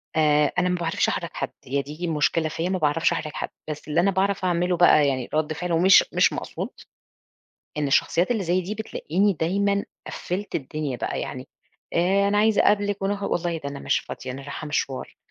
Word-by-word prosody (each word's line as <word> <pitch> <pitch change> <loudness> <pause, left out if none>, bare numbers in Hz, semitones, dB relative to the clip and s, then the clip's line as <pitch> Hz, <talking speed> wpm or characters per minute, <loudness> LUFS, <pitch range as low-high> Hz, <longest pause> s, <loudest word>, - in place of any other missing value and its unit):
آآ 150 -2 +3
أنا 180 0 +2
ما 180 - +1
باعرفش 170 -2 0
أحْرِج - - -2
حد - - -3
هي 140 +2 0
دي 150 +5 -6
المشكلة 160 0 +1
فيّا 165 +3 -2
ما 190 - 0
باعرفش 160 +1 +2
أحْرِج 155 -2 -3
حد، - - -4 0.2
بس 150 0 -6
اللي 155 +2 +1
أنا 195 +3 +3
باعرف 195 0 0
أعمله 180 0 +1
بقى 155 -4 +6
يعني 130 -3 -2
رد 155 0 0
فعل 180 +3 -4
ومش 180 +3 +6
مش - - +4
مقصود، - - -5 1.1
إن 150 - +1
الشخصيات 170 - +2
اللي 225 -4 +1
زي 175 +2 +1
دي 185 +4 -4
بتلاقيني 205 -2 0
دايمًا 200 +4 0 0.2
قفِّلت 195 +4 -5
الدنيا 145 -1 -3
بقى، - - -3
يعني 130 0 -6 0.4
آآ 195 +4 +2
أنا 205 +1 +2
عايزة 215 0 +4
أقابلِك 205 -1 +2
ونخ 200 +1 -1
والله 175 -3 -1
ده 140 -3 -5
أنا 140 0 -7
مش - - +1
فاضية 130 - -7
أنا 135 +2 -8
راحة 145 +2 -6
مشْوار، 140 -3 -3
170 Hz, 195 wpm, -24 LUFS, 150-195 Hz, 1.1 s, بقى